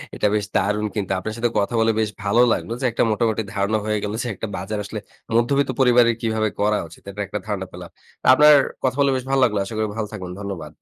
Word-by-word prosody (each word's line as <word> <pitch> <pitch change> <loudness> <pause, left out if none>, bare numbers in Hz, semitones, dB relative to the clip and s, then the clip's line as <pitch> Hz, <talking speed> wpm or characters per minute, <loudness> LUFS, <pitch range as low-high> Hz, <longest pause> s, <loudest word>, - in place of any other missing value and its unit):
এটা 105 - +1
বেশ 105 -1 0
দারুণ 105 +1 +1
কিন্তু 100 -2 -2
আপনার 110 +3 -5
সাথে 120 0 +1
কথা 100 +4 -1
বলে 115 0 +3
বেশ 110 -1 +1
ভালো 110 +4 +3
লাগলো - - -4
যে - - 0
একটা 115 - +1
মোটামুটি 110 0 0
ধারণা 100 +2 0
হয়ে 105 0 0
গেল 105 0 -3
যে - - -4
একটা 110 - -5
বাজার 100 +4 -4
আসলে 105 +1 -6 0.4
মধ্যবিত্ত 135 +3 +2
পরিবারের 120 -2 +5
কিভাবে 110 -1 0
করা 105 +1 +2
উচিত 80 - -16
এটার 105 +1 -4
একটা 105 +1 -4
ধারণা 100 -3 -2
পেলাম। 90 0 -9 0.3
তা - - -1
আপনার 150 +1 +7 0.3
কথা 130 0 +1
বলে 140 -1 +4
বেশ 130 - -2
ভালো 135 -1 +3
লাগলো। 105 -4 +2
আশা 110 - -7
করি 110 0 0
ভালো 110 -2 -2
থাকবেন। 90 -4 -7
ধন্যবাদ। 95 -7 -6
110 Hz, 235 wpm, -22 LUFS, 100-120 Hz, 0.4 s, আপনার